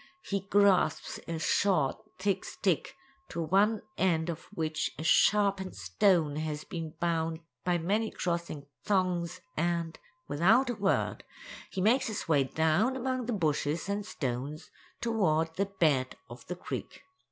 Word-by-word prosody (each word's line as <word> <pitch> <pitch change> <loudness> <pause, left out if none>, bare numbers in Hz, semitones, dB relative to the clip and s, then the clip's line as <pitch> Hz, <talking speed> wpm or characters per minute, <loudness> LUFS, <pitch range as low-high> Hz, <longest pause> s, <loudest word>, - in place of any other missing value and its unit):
He 200 - -1
grasps 200 -2 +3
a 165 - -2
short, 160 -1 +2 0.2
thick 190 0 0
stick, 190 - -1 0.3
to - - -5
one 195 +6 +2 0.2
end 170 -3 +2
of 165 - -8
which 155 -5 -2
a 155 - -5
sharpened 195 +2 +3
stone 150 - +2
has 155 -1 -3
been 165 -3 -6
bound 165 -1 0 0.2
by 180 -1 +2
many 205 +7 0
crossing 170 -5 -3 0.2
thongs, 185 -3 0
and, 170 0 -1 0.3
without 220 - +4
a - - -4
word, 200 -2 0 0.5
he 190 - -3
makes 235 +7 +3
his 215 -4 -4
way 145 -4 +3
down 160 - +2
among 255 -1 -2
the 245 - 0
bushes 155 -2 0
and 200 +1 -1
stones 140 - -4 0.3
toward 165 -9 +1
the 200 +3 0
bed 150 -9 +1 0.2
of 120 0 -11
the 180 - -3
creek. 180 - -6
175 Hz, 140 wpm, -30 LUFS, 155-200 Hz, 0.5 s, without